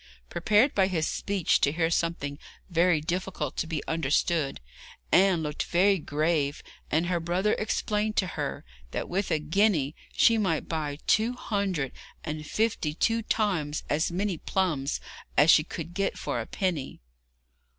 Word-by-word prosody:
Prepared 210 +9 +3
by 190 -2 +3
this 165 -4 0
speech 195 -4 +1
to 140 - +3
hear 165 +1 0
something 160 -4 -1 0.3
very 170 -1 +3
difficult 170 -3 -3
to - - -1
be 160 -3 -3
understood, 160 -1 0 0.5
Anne 185 -3 +4
looked 150 0 -3
very 195 +2 +3
grave, 150 -1 0 0.3
and 160 +3 +1
her 175 -1 0
brother 180 +5 +1
explained 215 0 -1
to 190 - +2
her 180 - -4 0.2
that - - -4
with 195 +3 -1
a 160 - +2
guinea 155 -1 +1 0.2
she 230 -1 +4
might 185 -7 0
buy 150 -3 -3
two 225 +3 +3
hundred 195 - -2 0.3
and 155 -1 -5
fifty 210 -9 0
two 230 +6 +1
times 185 -10 -1
as 160 +4 +1
many 185 -1 -1
plums 155 -8 -1 0.4
as 150 +3 +7
she 155 - +6
could 165 +1 -7
get 195 +2 -1
for - - -2
a - - -7
penny. 175 -9 -2
170 Hz, 150 wpm, -27 LUFS, 155-195 Hz, 0.5 s, as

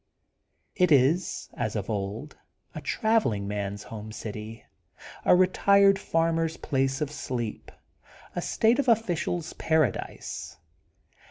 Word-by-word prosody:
It 180 -4 +3
is 150 +6 +3
as 110 -3 -3
of 100 -3 -3
old, 105 +7 -4 0.4
a 155 - -6
travelling 145 - +1
man's 100 -1 -3
home 110 -1 -8
city, 110 +1 -7 0.6
a - - +7
retired 195 +2 +5
farmer's 165 -2 0
place 135 -1 -1
of 150 -1 -1
sleep, 120 -6 -5 0.6
a - - -1
state 230 +4 +2
of 275 - +1
ficial's 175 -7 0
paradise. 155 - -1
150 Hz, 110 wpm, -27 LUFS, 110-180 Hz, 0.6 s, a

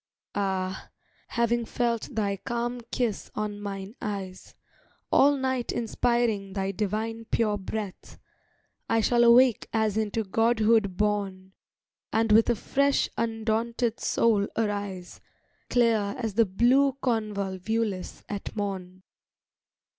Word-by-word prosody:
Ah, 190 -1 -2 0.4
having 235 0 +1
felt 235 0 -1
thy 205 -2 0
calm 240 +4 -3
kiss 235 -5 -1
on 205 -1 -3
mine 195 0 -6
eyes, 195 -3 -6 0.6
All 285 +1 +5
night 260 -2 -1
inspiring 230 -3 0
thy 195 -1 -1
divine 220 +3 -3
pure 220 -2 +1
breath, 205 0 -6 0.7
I 225 - +3
shall 240 +2 +3
awake 240 0 +5
as 220 -2 +1
into 220 +1 0
godhood 220 -2 +2
born, 195 -3 -1 0.6
And 225 0 +2
with 220 +2 +6
a 240 - +3
fresh, 280 +5 +1
undaunted 225 +1 -1
soul 210 -3 +2
arise, 205 -4 -3 0.5
Clear 225 -4 +2
as 225 -4 -3
the 230 +2 +4
blue 255 +8 +3
convolvulus 210 -3 -2
at 205 +1 -6
morn. 190 -3 -4
220 Hz, 110 wpm, -27 LUFS, 200-235 Hz, 0.7 s, with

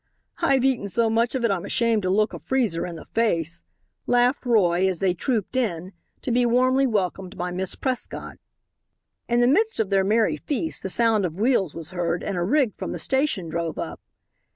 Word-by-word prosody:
"I've 265 -2 +2
eaten 255 -6 +1
so 225 +3 +1
much 230 +3 +1
of 250 -2 0
it 230 - +2
I'm 185 -3 -1
ashamed 230 0 +1
to 185 - -1
look 210 +1 +2
a 170 - -6
freezer 200 - -1
in 170 - -7
the - - -10
face," 170 -8 -1 0.5
laughed 245 +2 +2
Roy, 190 -5 +3
as 185 -2 -1
they 185 +1 +1
trooped 220 +5 -2
in, 190 -7 -2 0.3
to 255 - -2
be 245 +1 +3
warmly 255 +3 +3
welcomed 195 -3 -2
by 180 0 -3
Miss 185 +1 -3
Prescott. 260 -2 -4 0.9
In 240 0 +2
the 240 - +4
midst 430 - +2
of 210 -3 0
their 195 -1 +3
merry 215 +3 +2
feast 315 +2 -3
the 190 - -3
sound 225 0 +2
of 175 0 -3
wheels 215 - +1
was 165 +1 -6
heard 175 -1 -2
and 195 - -3
a 175 - -1
rig 250 +4 +2
from - - -5
the - - -4
station 265 - 0
drove 165 0 -3
up. - - -5
215 Hz, 200 wpm, -24 LUFS, 180-245 Hz, 0.9 s, the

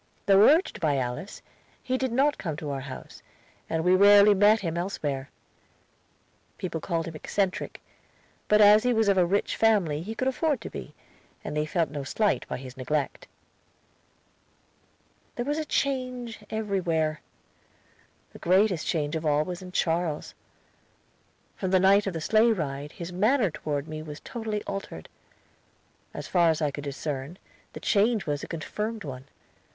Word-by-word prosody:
Though 200 +1 +7
urged 325 +6 +2
by 150 -4 +2
Alice, 125 +9 -4 0.4
he 255 - -1
did 260 -1 -1
not 280 +5 +2
come 160 -5 -4
to 150 -2 -5
our 135 - -3
house, 130 0 -9 0.5
and 160 0 -1
we 180 +1 +4
rarely 205 +2 +7
met 205 +3 +4
him 165 -3 -3
elsewhere. 145 -7 -3 1.3
People 170 -4 -4
called 165 -1 -2
him 165 - -6
eccentric, 190 +4 -2 0.7
but 210 0 +5
as 210 +1 +8
he 250 +1 +2
was 220 -1 +2
of 195 -2 +4
a 175 - +4
rich 200 +3 0
family 195 -10 +2
he 215 +6 -6
could 255 - -1
afford 285 +1 0
to - - -7
be, - - -8 0.5
and - - -5
they 150 0 0
felt 165 -3 0
no 145 -2 -4
slight 210 +9 0
by - - -4
his 130 0 -10
neglect. 140 +3 -2 2.1
There 240 - -3
was 295 +3 -1
a 310 - -2
change 255 -5 -2
everywhere. 175 -8 -1 1.1
The - - -12
greatest 185 -1 +2
change 150 -2 -1
of 160 - -3
all 150 -1 +2
was 180 +1 -6
in 180 -1 -9
Charles. 165 -3 -1 1.2
From 190 - -3
the 185 0 +4
night 195 +2 +4
of 195 - -2
the 165 - -4
sleigh 220 +7 +4
ride 145 -5 -4
his 170 +1 -7
manner 215 - +2
toward 150 -1 -4
me 155 -1 -6
was 150 -1 -8
totally 220 -3 -4
altered. 195 0 -6 1.0
As - - -7
far 175 -2 +3
as 160 - +1
I 150 -3 0
could 145 +1 -7
discern, 140 +2 -5 0.4
the - - -7
change 215 +1 +2
was 145 -1 -2
a - - -6
confirmed 210 +7 -4
one. 130 -3 -7
180 Hz, 165 wpm, -27 LUFS, 150-215 Hz, 2.1 s, as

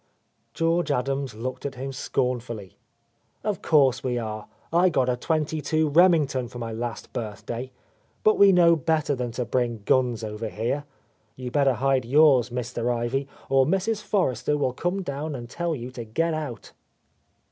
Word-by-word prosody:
George 165 0 +1
Adams 135 -2 -1
looked 125 +4 -5
at 140 -1 -4
him 135 +2 -5
scornfully. 120 -6 -3 0.7
"Of 210 -2 -2
course 135 -5 +3
we 125 -2 -1
are. 110 -2 -5 0.3
I 175 +2 +5
got 130 -6 +1
a 125 - +2
22 155 +2 0
Remington 150 -6 +4
for 120 - -10
my 115 -1 -4
last 115 +1 -5
birthday. 115 +3 -5 0.5
But 215 - +4
we 200 -1 +8
know 170 -2 +6
better 155 0 0
than 125 -2 -2
to 125 0 -2
bring 120 -2 -1
guns 125 -3 +2
over 110 +1 -4
here. 115 +9 -2 0.5
You 125 -1 -6
better 140 -1 +3
hide 135 0 +1
yours, 135 -2 +5
Mr. 120 0 -2
Ivy, 120 +3 -1 0.2
or 135 -1 +3
Mrs. 200 +5 0
Forrester 150 - 0
will 130 -3 0
come 175 +8 -2
down 145 -1 -4
and 120 -2 -7
tell 170 +5 -2
you 125 -1 -7
to 125 -2 -6
get 160 +10 -1
out." 145 -9 -5
130 Hz, 160 wpm, -25 LUFS, 120-155 Hz, 0.7 s, we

